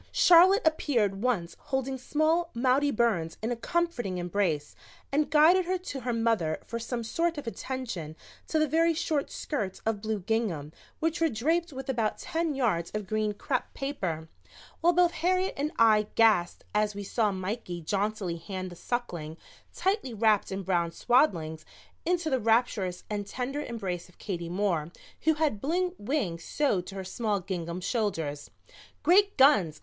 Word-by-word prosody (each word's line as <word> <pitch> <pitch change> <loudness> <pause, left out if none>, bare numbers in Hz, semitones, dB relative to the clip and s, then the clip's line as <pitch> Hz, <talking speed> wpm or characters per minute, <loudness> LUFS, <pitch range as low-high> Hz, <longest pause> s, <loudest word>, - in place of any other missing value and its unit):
Charlotte 360 +3 +6
appeared 235 -11 +1
once 200 -9 0
holding 265 0 -2
small 310 +6 +1
Maudie 260 +4 +3
Burns 215 -10 0
in 225 - -1
a - - 0
comforting 240 - -1
embrace 175 -4 -1 0.4
and 295 +2 +1
guided 320 +5 +5
her 370 +1 0
to 360 -6 -6
her 250 -1 -2
mother 225 -9 +1
for 230 - -4
some 235 +1 -3
sort 335 +8 -1
of 290 - -5
attention 230 - -5 0.3
to 315 - 0
the 310 0 +3
very 330 +3 +3
short 305 -2 -1
skirts 215 - -3
of 220 -2 0
blue 220 -1 -2
gingham 185 -8 -1 0.3
which 325 +1 -1
were 325 - +4
draped 320 +9 0
with 265 -1 -7
about 230 -5 0
ten 330 -3 -2
yards 205 -11 0
of 210 -1 -2
green 215 +1 0
crepe - - -2
paper, 185 - -3 0.5
while 340 +2 +4
both 350 0 +4
Harriet 370 +3 +1
and 295 +2 -2
I 215 -2 +5
gasped 215 -6 +3
as 210 0 +1
we 205 - -5
saw 210 +1 +1
Mikey 185 -1 -4
jauntily 200 -1 -1
hand 185 +2 -6
the - - -9
Suckling, 170 -9 -4 0.3
tightly 380 - -1
wrapped 215 -2 +2
in 190 0 -3
brown 175 -3 +1
swaddlings, 165 - +1 0.4
into 350 -2 +1
the 260 - +2
rapturous 220 -5 +1
and 205 -1 -3
tender 260 +6 -3
embrace 190 -9 -4
of 180 - -22
Katie 175 -4 -4
Moore, 175 -4 -1 0.3
who 315 -1 +4
had 295 -10 0
blue 355 +5 0
wings 205 - -2
sewed 205 -12 0
to 195 - -8
her 190 - -4
small 205 +2 -1
gingham 175 -2 -4
shoulders. 165 - -2 0.5
"Great 400 +3 +4
Guns! 210 - +5
225 Hz, 165 wpm, -28 LUFS, 185-295 Hz, 0.5 s, Charlotte